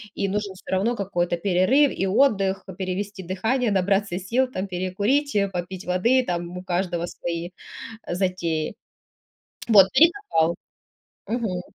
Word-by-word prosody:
и 200 Hz, -, -1 dB
нужен 200 Hz, 0 st, -2 dB
всё 185 Hz, -, -15 dB
равно 220 Hz, +6 st, +1 dB
какой-то 175 Hz, -3 st, -1 dB
перерыв 200 Hz, +11 st, +3 dB
и 195 Hz, -, 0 dB
отдых, 195 Hz, -3 st, +2 dB
п 190 Hz, -, -9 dB
перевести 190 Hz, +1 st, -4 dB
дыхание, 220 Hz, +7 st, 0 dB
набраться 195 Hz, -1 st, +1 dB
сил 240 Hz, +8 st, +1 dB
там, 190 Hz, -4 st, -3 dB
перекурить, 200 Hz, +10 st, 0 dB, 0.2 s
попить 180 Hz, +1 st, -5 dB
воды. 230 Hz, +9 st, +3 dB
Там 175 Hz, 0 st, -3 dB
у 180 Hz, -, -7 dB
каждого 175 Hz, -1 st, -1 dB
свои 170 Hz, 0 st, -5 dB, 0.6 s
затеи. 175 Hz, -4 st, -1 dB, 0.9 s
Вот, 200 Hz, -4 st, +8 dB
и 325 Hz, +6 st, +7 dB, 0.2 s
копал. 160 Hz, +1 st, +2 dB, 0.7 s
Мгм. 220 Hz, -7 st, -2 dB
190 Hz, 135 wpm, -24 LUFS, 180-210 Hz, 0.9 s, Вот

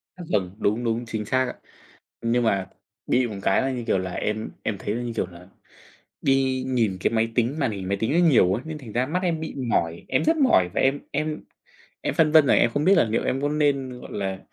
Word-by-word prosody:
À, 180 Hz, -, -9 dB
vầng, 95 Hz, -4 st, 0 dB
đúng, 110 Hz, +3 st, 0 dB
đúng, 115 Hz, +1 st, -1 dB
chính 110 Hz, -2 st, -4 dB
xác 130 Hz, +4 st, +1 dB
ạ. 125 Hz, -, -4 dB, 0.7 s
Nhưng 120 Hz, +1 st, +1 dB
mà 100 Hz, -4 st, +1 dB, 0.4 s
bị 125 Hz, 0 st, +2 dB
một 105 Hz, -, -6 dB
cái 95 Hz, -, +3 dB
là, 135 Hz, -, 0 dB
như 125 Hz, -2 st, -4 dB
kiểu 95 Hz, -, +2 dB
là, 95 Hz, 0 st, -3 dB
em 110 Hz, +3 st, -2 dB
em 105 Hz, -, -2 dB
thấy 100 Hz, +2 st, -3 dB
nó, 120 Hz, -, -3 dB
như 120 Hz, -1 st, -4 dB
kiểu -, -, -1 dB
là, 90 Hz, 0 st, -14 dB, 0.8 s
đi 135 Hz, -1 st, +2 dB
nhìn 115 Hz, -7 st, +1 dB
cái -, -, +1 dB
máy 115 Hz, 0 st, +2 dB
tính 125 Hz, +5 st, 0 dB
màn 135 Hz, -6 st, +1 dB
hình 95 Hz, -3 st, -5 dB
máy 100 Hz, -, 0 dB
tính 115 Hz, -, 0 dB
nó 170 Hz, -, +3 dB
nhiều 95 Hz, -, +4 dB
ấy, 120 Hz, -, -3 dB
nên 155 Hz, -1 st, -5 dB
thành 120 Hz, -7 st, -10 dB
ra 125 Hz, +3 st, 0 dB
mắt 180 Hz, +6 st, -2 dB
em 170 Hz, -3 st, 0 dB
bị 160 Hz, -, -5 dB
mỏi. 85 Hz, -10 st, -1 dB
Em -, -, +1 dB
rất 320 Hz, +1 st, +3 dB
mỏi 250 Hz, -, +4 dB
và -, -, +1 dB
em 135 Hz, +2 st, +2 dB
em 155 Hz, +2 st, -3 dB, 0.6 s
em -, -, -2 dB
phân 155 Hz, -2 st, +3 dB
vân 155 Hz, -2 st, +7 dB
là -, -, +5 dB
em 115 Hz, -, +4 dB
không 145 Hz, +4 st, -1 dB
biết 195 Hz, -, +6 dB
là 170 Hz, -, +5 dB
liệu 110 Hz, 0 st, -1 dB
em 135 Hz, -, -1 dB
có 145 Hz, -, 0 dB
nên, 140 Hz, -4 st, 0 dB
gọi -, -, -10 dB
là, 95 Hz, -2 st, -3 dB
120 Hz, 255 wpm, -24 LUFS, 105-145 Hz, 0.8 s, vân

